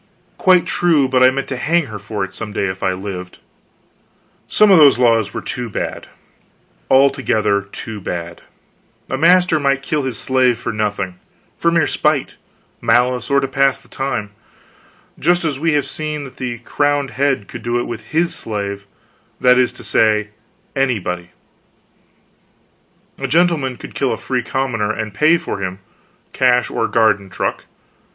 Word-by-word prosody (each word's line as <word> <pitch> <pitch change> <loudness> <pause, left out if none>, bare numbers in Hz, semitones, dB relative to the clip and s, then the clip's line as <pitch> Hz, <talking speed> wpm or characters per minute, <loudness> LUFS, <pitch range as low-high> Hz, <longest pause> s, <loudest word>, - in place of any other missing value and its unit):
Quite 180 -2 +4
true, 165 -6 +2
but 130 -1 +2
I 130 - +8
meant 135 +1 -3
to 130 - -3
hang 165 +5 +1
her 110 -5 -8
for 100 0 -4
it 95 0 -6
some 105 +2 -6
day 100 - -1
if 95 0 -4
I 95 - +1
lived. 90 -1 -6 1.1
Some 215 -1 +4
of 185 - +7
those 145 -4 +7
laws 115 -4 +3
were - - -6
too 120 -1 -4
bad, - - -4 0.8
altogether 115 -7 +3
too 100 +1 -8
bad. 85 -2 -5 0.7
A 130 - 0
master 175 0 +4
might 140 -1 +1
kill 150 +1 -1
his 130 -5 -3
slave 130 -1 +2
for 115 -1 -4
nothing 100 -4 -2 0.4
for 170 - +1
mere 170 -1 +3
spite, 150 -3 0 0.5
malice, 125 +1 +2
or 140 0 +4
to 135 - -1
pass 135 0 +2
the - - -21
time 135 -7 -3 0.9
just 175 +2 +2
as 145 -4 -2
we 165 +1 +1
have 145 -1 +1
seen 150 -1 -3
that 135 - -11
the 120 -2 -4
crowned 145 -2 0
head 135 -6 0
could - - -9
do 120 0 -1
it 120 - -1
with 115 -2 -6
his 165 +7 0
slave, 100 -2 -5 0.5
that 125 0 +5
is 125 - +3
to - - -9
say, 105 -1 +2 0.5
anybody. 95 -10 -1 1.9
A 135 - -2
gentleman 150 -4 +1
could - - -10
kill 135 -2 0
a - - -2
free 130 -2 -2
commoner, 120 -4 -1
and 110 -1 -4
pay 155 +8 +4
for 100 - -5
him 95 -1 -3 0.6
cash 125 -1 +2
or - - 0
garden 105 -4 +2
truck. - - -3
125 Hz, 165 wpm, -18 LUFS, 105-140 Hz, 1.9 s, I